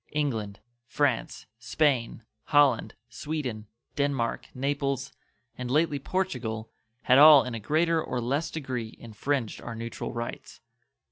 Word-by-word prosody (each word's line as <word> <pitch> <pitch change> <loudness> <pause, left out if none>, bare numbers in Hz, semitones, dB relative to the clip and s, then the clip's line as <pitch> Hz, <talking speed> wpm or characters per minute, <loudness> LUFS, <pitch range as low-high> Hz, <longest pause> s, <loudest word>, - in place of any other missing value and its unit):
England, 115 -9 -2 0.3
France, 140 -4 -1
Spain, 120 -2 0 0.2
Holland, 145 -5 +3
Sweden, 120 -2 -5 0.3
Denmark, 140 -5 -1
Naples, 140 0 -2 0.4
and 125 0 -5
lately 150 +1 +2
Portugal 125 -10 -3 0.3
had 130 +1 +5
all 150 -2 +9
in 125 - -5
a 115 - -4
greater 160 +8 +1
or 125 - -3
less 140 +7 -1
degree 130 -7 -5
infringed 115 +2 -3
our 120 - -6
neutral 115 +1 -5
rights. 120 0 -6
130 Hz, 120 wpm, -27 LUFS, 115-145 Hz, 0.4 s, all